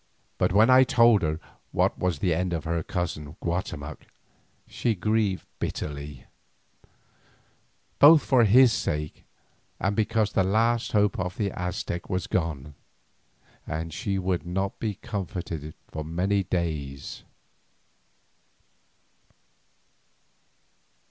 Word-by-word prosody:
But - - +2
when 110 +6 +5
I 130 +1 +8
told 115 -4 +5
her 80 0 -1 0.3
what - - +1
was 90 -4 0
the 85 +3 +1
end 90 +2 -1
of 80 - -2
her 85 0 -1
cousin 80 -4 -4
Guatemoc 80 -4 -4 0.6
she 115 -2 -1
grieved 105 0 0
bitterly, 70 -3 -5 1.7
both 150 +1 +8
for 125 -4 +4
his 120 +3 +6
sake 75 -5 -3 0.5
and 100 +2 0
because 110 -1 +1
the - - +3
last 115 +5 +1
hope 105 -2 +2
of 90 +1 -3
the 100 -2 -1
Aztec 90 -1 -4
was 90 -1 -1
gone, 75 -5 -2 0.9
and 80 0 -4
she 100 +5 -2
would 95 -2 -1
not 95 +3 -3
be 105 -3 -2
comforted 90 -8 -5
for 80 - -6
many 90 +6 0
days. 75 -7 -3
90 Hz, 110 wpm, -26 LUFS, 80-105 Hz, 1.7 s, I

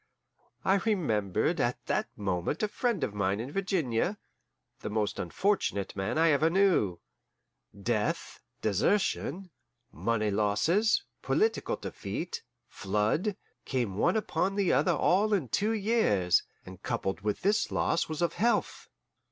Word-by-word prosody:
I 195 - +4
remembered 125 - 0
at - - -1
that - - 0
moment 95 - -2
a - - +3
friend 235 - -1
of - - -2
mine 100 0 0
in 125 +5 -5
Virginia, 185 - 0 0.6
the - - -5
most 105 -1 -1
unfortunate 190 - -1
man 95 +7 -2
I 165 0 +5
ever 155 +3 +3
knew. 175 - +3 0.8
Death, 105 0 -1 0.2
desertion, 180 - 0 0.4
money 110 -2 0
losses, 155 - +2 0.2
political 445 +1 +1
defeat, 175 +2 -5 0.3
flood, 105 - -1 0.3
came 120 -7 -1
one 175 - +2
upon 195 -2 -1
the 200 -3 +2
other 145 +4 +3
all 205 +4 +3
in 150 - -2
two 210 - +1
years, 200 - +2 0.2
and 95 0 -11
coupled 95 -1 -2
with 105 0 -2
this 205 +3 +2
was 165 - 0
loss 155 0 -4
of 170 - +1
health. 230 +6 0
155 Hz, 130 wpm, -29 LUFS, -, 0.8 s, I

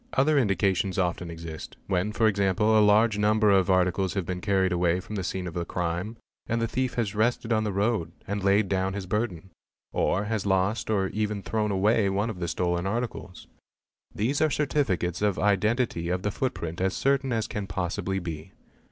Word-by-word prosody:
_ - - -33
Other 145 +2 +3
indications 100 -3 +1
often 90 -2 -1
exist: 80 -1 -8
when 95 +2 0
for 115 +1 +1
example 100 +1 +2
a 110 - +6
large 105 +1 +4
number 105 0 +3
of 95 -2 +3
articles 95 +1 +2
have 95 -3 -1
been 90 +1 -4
carried 95 -2 +1
away 90 0 +2
from 95 +4 -9
the 100 -3 -2
scene 90 0 -3
of 85 - -5
the 85 -1 -2
crime 90 +5 -3 0.3
and 115 0 0
the 115 - 0
thief 130 +2 -2
has 110 -4 -1
rested 115 +2 +1
on 110 0 +1
the 105 - -1
road, 100 -3 0
and 100 0 -3
laid 100 +1 +3
down 95 0 0
his 100 -1 -4
burden; 95 -3 -3 0.4
or 100 - +1
has 105 -1 -2
lost 95 +3 0
or 95 -3 +1
even 105 -1 -2
thrown 110 -1 -1
away 100 +1 +2
one 100 +4 0
of 95 - -9
the 85 - -2
stolen 85 +1 -1
articles. 110 -4 -4 0.7
These 125 +8 -1
are 155 - +4
certificates 120 - 0
of 105 -2 +1
identity 105 -2 +1
of 90 +1 -1
the 105 - 0
footprint 85 -9 -3
as 95 +1 0
certain 135 -1 +1
as 115 -2 0
can 100 -2 -5
possibly 95 +1 -2
be. 85 -1 -6
100 Hz, 195 wpm, -27 LUFS, 90-110 Hz, 0.7 s, a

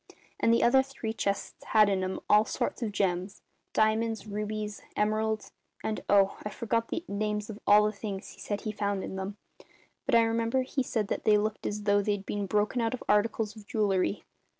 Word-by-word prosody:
And 230 - +3
the 230 - +4
other 265 +3 +6
three 265 -5 -5
chests 200 -3 -3
had 215 -2 +5
in 195 -2 +1
'em 185 0 -2
all 210 +1 +6
sorts 220 - -3
of 225 -3 -1
gems 190 0 -1 0.3
diamonds, 220 0 +1
rubies, 210 0 -4
emeralds 215 +1 0 0.3
and 220 - -2
oh, 195 -1 +4
I 210 - -3
forget 230 +1 -1
the 335 - -4
names 210 +1 -2
of 210 - -9
all 210 +1 +7
the 210 - +1
things 200 -2 -6
he - - -14
said 205 -1 -3
he 215 - -3
found 200 -2 -2
in - - -5
them; 190 +2 -5 0.7
but - - +3
I 230 - +7
remember 230 +3 +1
he 265 +2 -2
said 220 -4 -1
that - - -2
they 210 -1 +5
looked 215 +1 -2
as 210 0 -3
though 205 0 +3
they'd 205 -1 -1
been 205 -1 -2
broken 210 +5 +1
out 230 +2 0
of - - -10
articles 210 +1 +1
of 210 -2 -13
jewellery. 200 -2 +1
210 Hz, 200 wpm, -29 LUFS, 205-225 Hz, 0.7 s, all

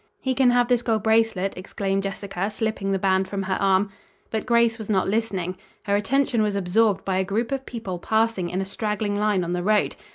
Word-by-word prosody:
"He 260 - -1
can 255 -1 +4
have 245 0 +3
this 245 -1 +2
gold 225 -4 0
bracelet," 220 -4 +2
exclaimed 195 +1 -2
Jessica, 195 0 -3
slipping 215 -2 -2
the 195 - +2
band 190 0 +1
from 195 0 -3
her 190 0 -1
arm. 195 +1 +2 0.4
But 220 +1 -3
Grace 235 -1 +3
was 220 - -7
not 195 -3 +2
listening. 190 -4 -1 0.3
Her 200 -1 +1
attention 235 +3 +1
was 210 -1 0
absorbed 200 +1 +1
by 190 -1 0
a 190 - +2
group 220 +6 -2
of 270 -1 -3
people 200 -7 -5
passing 220 -2 0
in 185 +2 -2
a - - -2
straggling 210 +1 -2
line 205 -3 +1
on 175 +1 -2
the 180 - -1
road. 210 +3 +2
205 Hz, 215 wpm, -24 LUFS, 190-225 Hz, 0.4 s, can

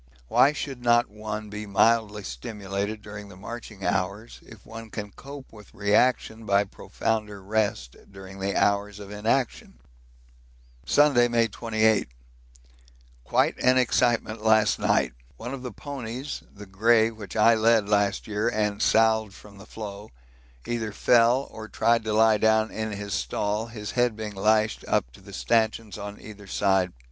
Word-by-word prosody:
Why 140 - +5
should 140 -4 -6
not 120 -2 +3
one 105 0 -6
be 105 0 -6
mildly 105 0 +2
stimulated 100 - -5
during 105 -1 -9
the 95 - -12
marching 110 0 -8
hours 100 +3 -2
if 110 -4 -15
one 115 0 -9
can 105 -1 -6
cope 140 +1 -11
with 105 -2 -15
reaction 110 +2 +1
by 100 -1 +3
profounder 105 +1 -3
rest 100 - -2 0.2
during 95 0 -11
the 100 +1 -2
hours 100 0 +1
of 100 -1 -10
inaction? 110 - -1 1.1
Sunday, 140 -5 +4
May 115 -1 +2
28. 110 - +1 1.1
Quite - - +1
an 130 0 +4
excitement 120 -3 +1
last 110 -1 +3
night. - - +1 0.2
One 120 - -6
of 135 - -6
the 125 -1 -6
ponies 135 -1 -6
(the 105 0 -12
grey 110 +4 +3
which 110 -3 -10
I 110 +2 +5
led 110 -1 +3
last 100 -1 +1
year 105 +1 -1
and 105 -2 -1
salved 110 -2 +3
from 100 0 -15
the 105 - -13
floe) 105 -1 -8 0.6
either 115 -2 -3
fell 120 +5 +3
or 110 0 -8
tried 115 +2 +1
to 110 - -1
lie 110 0 +4
down 110 0 +3
in 110 0 -3
his 100 -1 -5
stall, 105 +2 -2
his 105 -3 -7
head 120 -2 +1
being 110 -1 -6
lashed 110 +2 +1
up - - 0
to - - -17
the - - -13
stanchions 110 - 0
on 105 0 -7
either 105 -2 -12
side. 95 -2 +1
110 Hz, 155 wpm, -26 LUFS, 100-115 Hz, 1.1 s, Why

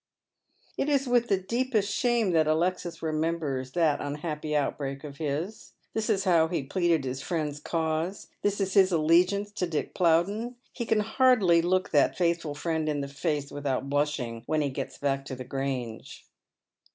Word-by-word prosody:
It 285 - +1
is 275 -2 +2
with 245 -1 +3
the 195 - +3
deepest 215 +1 0
shame 240 -5 +2
that 160 -2 +3
Alexis 175 +2 0
remembers 155 -5 -1
that 160 -4 +2
un 145 0 -3
nappy 150 -1 -3
outbreak 140 -1 -2
of 140 -2 -8
his. 160 +7 -4 0.2
This 220 0 -1
is 195 -3 +2
how 170 -4 +4
he 170 -2 -1
has 135 - -12
pleaded 170 -6 +2
his 130 +1 -3
friend's 150 -4 -2
cause. 160 +4 -2
This 205 0 0
is 190 -1 -1
his 190 -1 +5
allegiance 180 +5 +3
to 185 -3 -2
Dick 155 -3 -3
Plowden. 195 +8 +1 0.2
He 235 -2 -4
can 220 -1 +3
hardly 220 -6 +4
look 185 +2 +1
that 145 -3 +3
faithful 170 -4 0
friend 160 0 -1
in 145 -1 -1
the 140 - -4
face 145 0 -2
without 140 -1 -2
blushing, 145 -6 -1
when 155 -1 +1
he 140 -2 -1
jets - - -5
back 135 -1 -1
to 130 - -5
the 130 - -7
Grange. 130 -4 -4
165 Hz, 175 wpm, -28 LUFS, 145-195 Hz, 0.2 s, his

